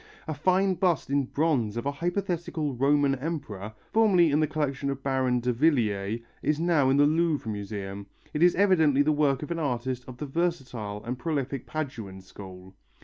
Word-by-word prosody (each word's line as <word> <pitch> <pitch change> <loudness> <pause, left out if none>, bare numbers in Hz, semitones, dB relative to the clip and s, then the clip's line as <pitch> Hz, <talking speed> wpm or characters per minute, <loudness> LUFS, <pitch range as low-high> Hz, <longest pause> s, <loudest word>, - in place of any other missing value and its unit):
A 155 - -2
fine 185 +5 +2
bust 175 -6 0
in 140 -1 +2
bronze 130 -7 0
of 120 - -3
a 140 - +1
hypothetical 170 -2 -2
Roman 140 +2 +3
emperor, 125 - -5 0.2
formerly 190 -8 +4
in 145 - +3
the 155 - +2
collection 140 -2 -2
of 135 -1 -4
Baron 130 -2 +1
Davillier, 115 -5 +1 0.2
is 150 0 0
now 165 -5 +3
in 135 - +3
the 145 - +6
Louvre 155 -6 +1
Museum. 100 -1 -6 0.3
It 150 - -2
is 175 0 +5
evidently 160 -8 +4
the 155 - +2
work 145 -2 +1
of 150 - -6
an 170 - -2
artist 125 -3 -2
of 125 -1 -9
the 150 - -4
versatile 130 -10 -3
and 125 +2 -4
prolific 140 -5 -3
Paduan 110 -11 -5
school. 95 -1 -12
140 Hz, 175 wpm, -27 LUFS, 120-160 Hz, 0.3 s, the